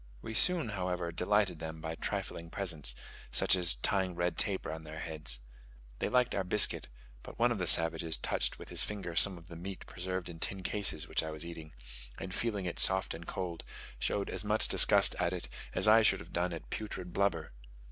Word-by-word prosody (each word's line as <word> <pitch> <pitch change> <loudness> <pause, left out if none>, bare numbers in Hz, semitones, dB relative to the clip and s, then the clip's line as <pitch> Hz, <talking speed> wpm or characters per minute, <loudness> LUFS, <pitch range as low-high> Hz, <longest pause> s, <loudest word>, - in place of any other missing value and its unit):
We 110 - -6
soon, 170 +1 +4
however, 90 -3 -3
delighted 95 0 +1
them 80 0 -6
by 80 +1 -5
trifling 85 +1 -4
presents, 80 -11 0 0.4
such - - +4
as 90 -1 +4
tying 95 -2 -1
red 85 0 -1
tape 95 +3 0
round 80 0 -5
their 80 0 -9
heads. 80 -7 -3 0.6
They - - -1
liked 125 -1 +2
our 100 - 0
biscuit: 100 +3 +2 0.3
but - - -11
one 120 +1 +3
of 115 - -2
the 90 - -1
savages 80 -1 +4
touched - - -1
with - - -11
his - - +2
finger 95 -5 -3
some 95 +1 +5
of 85 - -14
the 85 - -10
meat 95 +3 -7
preserved 90 0 -5
in 85 -2 -9
tin 95 +2 -3
cases 85 -6 0
which - - +1
I 80 - -5
was 80 +1 -5
eating, 80 -4 -9 0.4
and 95 - -6
feeling 105 -5 -2
it 85 - -3
soft 95 0 +4
and 85 +1 -9
cold, 90 -3 -4 0.4
showed 100 -1 -1
as 95 - -2
much 105 +1 +2
disgust - - +6
at 90 0 0
it, 90 - -5 0.3
as - - +3
I 110 +1 +7
should 110 - +3
have - - -12
done 90 +1 0
at 85 - -8
putrid 95 -5 -5
blubber. 100 -8 0
90 Hz, 205 wpm, -32 LUFS, 85-100 Hz, 0.6 s, I